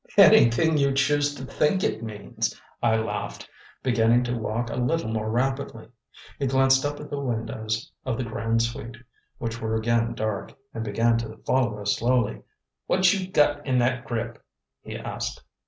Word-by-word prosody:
"Anything 150 +7 +6
you 140 -1 +3
choose 145 +1 +2
to 130 - -7
think 170 +8 +1
it 110 - 0
means," 105 -3 -4 0.2
I 110 - +3
laughed, 110 -2 -3 0.4
beginning 120 -1 +3
to 120 0 -2
walk 115 +1 -2
a - - -3
little 125 0 0
more 110 -1 -2
rapidly. 130 -1 -2 0.5
He 140 - 0
glanced 135 0 +4
up 145 0 -2
at 150 - -9
the 145 - -2
windows 110 -3 -3
of 130 -3 -2
the 130 - -1
"Grande 115 0 0
Suite," 115 0 -5 0.4
which 115 0 -4
were 110 0 -1
again 115 +1 +1
dark, 110 -2 -3 0.2
and 115 - -4
began 115 +2 +2
to 110 -1 -6
follow 120 -5 +1
us 100 0 0
slowly. 120 -2 +1 0.5
"What 185 0 +4
you 190 -2 -3
gut 145 -3 +3
in 130 -2 +1
that 125 +1 +1
grip?" 115 -1 -4 0.4
he - - -7
asked. - - -5
120 Hz, 170 wpm, -25 LUFS, 110-135 Hz, 0.5 s, Anything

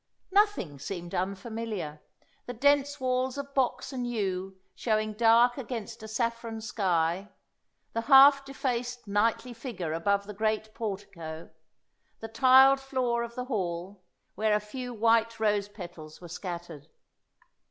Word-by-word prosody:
Nothing 395 - +2
seemed 175 +3 -6
unfamiliar; 195 -4 -4 0.5
the 245 - -5
dense 285 +3 +2
walls 255 0 0
of 280 0 -6
box 270 +1 0
and 245 -2 -3
yew 190 -4 -3
showing 215 -2 0
dark 235 +3 +4
against 235 -5 -6
a 220 - -8
saffron 230 0 -2
sky, 190 -3 0 0.6
the 230 - -1
half 275 +3 +7
defaced 245 -3 -3
knightly 225 +4 +1
figure 225 - -5
above 200 +5 +1
the 210 - -7
great 215 +1 -1
portico, 190 -7 -6 0.7
the 225 - -6
tiled 260 +4 +6
floor 255 -3 -1
of 235 0 -6
the 250 - -4
hall, 185 -4 -4 0.3
where 215 0 +1
a - - +2
few 245 +4 -7
white 230 0 +2
rose 205 -2 +1
petals 175 -6 -10
were 175 - -10
scattered. 170 -4 -7
220 Hz, 130 wpm, -29 LUFS, 195-245 Hz, 0.7 s, half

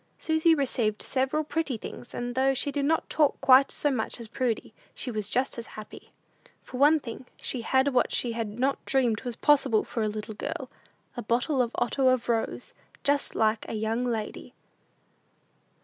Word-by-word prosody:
Susy 320 +1 +3
received 235 -7 0
several 270 +4 0
pretty 305 -4 -2
things; 240 - -9
and 245 0 -3
though 265 +1 +2
she 285 - 0
did 280 -1 -1
not 320 +2 +1
talk 300 -3 +2
quite 265 +1 +6
so 290 - +1
much 245 -1 -2
as 230 - -7
Prudy, 235 -1 -2 0.2
she 250 - -4
was 215 -2 -3
just 255 0 0
as 230 - -6
happy. 215 -1 -11 0.5
For 250 - -8
one 295 +4 +5
thing, 250 -1 -8
she 250 - -2
had 265 +4 +2
what 255 -3 +2
she 240 - 0
had 225 -2 -4
not 275 +2 0
dreamed 245 -5 +1
was 245 -2 -4
possible 270 -6 +3
for 230 - -4
a 215 - +1
little 215 +1 -5
girl 210 - -5 0.4
a 240 - -4
bottle 245 +5 +1
of 240 - +1
otto 260 +2 +1
of 255 -2 +2
rose; 235 - -1 0.3
"just 285 0 0
like 220 0 +2
a - - -3
young 220 +3 -1
lady." 225 -4 -4
250 Hz, 180 wpm, -27 LUFS, 225-275 Hz, 0.5 s, quite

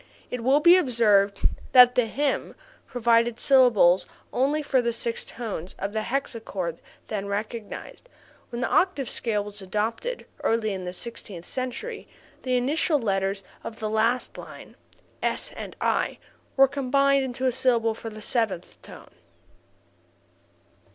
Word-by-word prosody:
It 250 -2 -4
will 270 +4 +4
be 345 +4 +7
observed 210 - +3 0.3
that 250 -1 +9
this 245 -3 +1
hymn 285 0 -1 0.3
provided 235 -1 +2
syllables 240 -10 +5 0.3
only 290 +4 +1
for 265 -3 +2
the 235 -1 0
six 230 0 -3
tones 200 -7 -6
of 200 +1 -4
the 220 - 0
hexachord 220 - -3 0.3
then 200 -2 -4
recognized; 215 - -6 0.4
when 240 -1 -5
the - - +1
octave 350 -8 +1
scale 210 -3 -1
was 205 0 -7
adopted 220 - -3 0.2
(early 225 -2 +1
in 185 -1 -5
the 180 - -4
sixteenth 185 -4 -7
century) 270 - -5 0.3
the 255 -1 0
initial 295 +5 +1
letters 195 -4 -1 0.2
of 225 - -7
the 215 -1 -3
last 230 +3 0
line - - -11 0.5
(s - - -2
and - - -7
i) - - 0 0.4
were 270 0 +7
combined 275 0 +2
into 260 0 -3
a 255 - +3
syllable 240 -3 +2
for 225 +1 -7
the 215 0 -10
seventh 215 -6 -2
tone. - - -13
235 Hz, 140 wpm, -25 LUFS, 210-260 Hz, 0.5 s, that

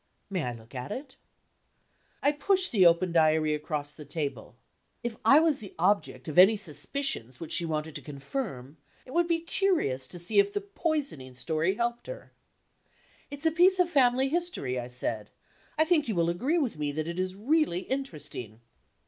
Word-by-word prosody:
"May 185 -7 -1
I 125 - -3
look 115 +1 -14
at 125 +1 -6
it?" 265 0 -7 1.1
I 285 - +5
pushed 370 +6 +2
the 190 -7 +6
open 170 +1 +3
Diary 155 -2 +3
across 150 -1 -3
the 155 - -10
table. 140 -6 -5 0.5
If 235 -2 -3
I 285 - +7
was 315 -3 +2
the 200 -5 -10
object 200 +2 0
of 155 +2 +2
any 195 +4 +8
suspicions 185 - -1
which 165 - -7
she 170 - +1
wanted 155 -1 -3
to - - -10
confirm, 140 - -6 0.3
it 255 - -12
would 340 +1 +2
be 335 -1 +1
curious 335 - 0
to 180 - -8
see 175 - +2
if 400 0 +3
the 410 - -1
poisoning 300 - -3
story 160 +7 0
helped 235 +1 -2
her. - - -9 1.0
"It's 285 +2 -6
a 320 - +4
piece 360 +4 +5
of 360 -1 +2
family 260 -2 +3
history," 310 - -2
I 120 - -5
said; 115 -4 -2 0.5
"I 315 - +4
think 315 -4 +2
you 220 - -1
will 170 0 +2
agree 260 - 0
with 260 - -1
me 145 -1 -1
that 155 +1 -3
it 170 +1 -4
is 185 0 -2
really 245 - +1
interesting." 150 - -5
185 Hz, 180 wpm, -28 LUFS, -, 1.1 s, any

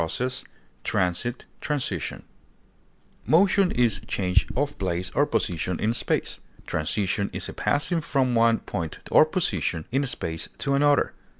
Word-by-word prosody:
action, 80 +9 -1
move, 130 0 -2 0.4
passage, 90 +8 -1 0.2
transit, 145 -3 -3 1.0
Motion 190 +3 +4
is 115 - +3
change 90 -1 +1
of 145 +3 -1
place 95 -1 -2
or 145 +1 +3
position 90 - -1
in 110 +2 +1
space; - - 0 0.3
transition 95 +5 -1
is - - -3
a - - -7
passing 165 +4 0
from 135 -4 +1
one 115 0 +4
point 80 -2 -5
or - - +8
position 95 - -1
in 135 +3 +2
space 80 -9 -3
to 140 - -1
another. 145 +1 +3
115 Hz, 135 wpm, -25 LUFS, 90-145 Hz, 1.0 s, or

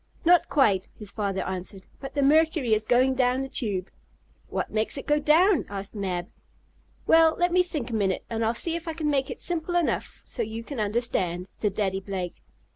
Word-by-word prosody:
"Not 350 0 +5
quite," 200 -10 +3
his 210 -2 -7
father 200 -3 -2
answered. 190 +1 -5
"But 270 - -8
the 285 - +2
mercury 310 -4 +3
is 215 0 0
going 255 +2 +4
down 255 0 +1
the - - -4
tube." 200 -8 -2 0.6
"What - - -3
makes 215 +5 -1
it 275 - -6
go 295 0 +2
down?" 330 +4 +4
asked 200 0 -4
Mab. 185 -4 -3 0.7
"Well, 325 -1 +5
let 350 0 +2
me 365 +1 +5
think 300 -9 -4
a - - -4
minute, 195 -3 0
and 225 0 -2
I'll 225 +1 +1
see 330 +8 -1
if 335 0 -6
I 325 - -2
can 310 -2 -1
make 270 -2 0
it - - -6
simple 350 0 -2
enough 345 -2 -1
so 245 - -3
you 225 +1 -4
can 275 0 -6
understand," 205 -5 -1
said 205 -3 -2
Daddy 195 -2 0
Blake. 190 -2 -5
235 Hz, 200 wpm, -26 LUFS, 200-305 Hz, 0.7 s, Not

